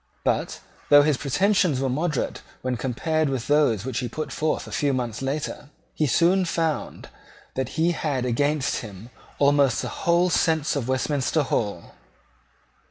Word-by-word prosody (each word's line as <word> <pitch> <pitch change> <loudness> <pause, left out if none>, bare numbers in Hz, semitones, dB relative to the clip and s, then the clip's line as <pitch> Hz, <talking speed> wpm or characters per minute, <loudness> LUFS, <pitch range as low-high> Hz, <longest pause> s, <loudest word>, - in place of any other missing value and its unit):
But, - - -1 0.3
though 145 0 +8
his 150 -2 +2
pretensions 180 0 +2
were 135 - 0
moderate 150 +2 -2 0.2
when 130 -1 -1
compared 145 +6 -1
with 130 -3 -2
those 145 -8 +2
which 130 -3 -2
he 125 -2 -3
put 150 +3 -5
forth 155 +3 -1
a - - -10
few 145 -2 0
months 120 -3 -3
later, 145 +1 -4 0.2
he 155 - 0
soon 180 +7 +3
found 165 -2 -2 0.4
that 130 -1 -4
he 165 +2 +3
had 145 -6 -2
against 145 +4 0
him 105 +2 -9 0.3
almost 140 -2 +3
the - - -3
whole 175 +1 +1
sense 160 -2 +1
of 135 -4 -2
Westminster 140 +3 0
Hall. 100 -9 -3
145 Hz, 155 wpm, -24 LUFS, 130-155 Hz, 0.4 s, though